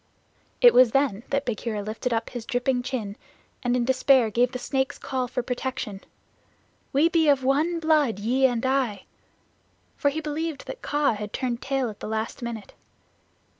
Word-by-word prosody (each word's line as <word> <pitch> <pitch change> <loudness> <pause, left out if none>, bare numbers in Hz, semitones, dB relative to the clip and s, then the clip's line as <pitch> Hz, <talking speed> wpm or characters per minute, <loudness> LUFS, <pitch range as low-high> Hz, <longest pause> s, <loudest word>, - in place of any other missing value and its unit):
It 485 -1 +8
was 250 -3 +6
then 270 -7 +2
that 280 0 0
Bagheera 220 -3 -3
lifted 220 +4 -3
up 225 -1 -1
his 240 -3 -7
dripping 250 -1 0
chin, 240 -6 -4 0.4
and 245 0 +1
in 245 -1 +1
despair 260 -2 +4
gave 245 +3 +2
the 255 - -4
Snake's 265 +2 -1
Call 255 -1 -3
for 250 0 -3
protection 245 -5 -4 0.9
"We 290 +4 +4
be 330 -2 +2
of 275 -2 +3
one 305 +6 +1
blood, 305 - +2
ye 250 +6 +3
and 245 -1 -2
I" 260 -7 0 0.9
for 285 - +2
he 295 +3 -3
believed 310 0 -4
that - - -8
Kaa 290 -3 +1
had 210 0 -6
turned 250 -2 -2
tail 270 -2 -1
at 210 - -15
the - - -6
last 220 +2 -3
minute. 230 -4 -6
255 Hz, 170 wpm, -25 LUFS, 230-275 Hz, 0.9 s, It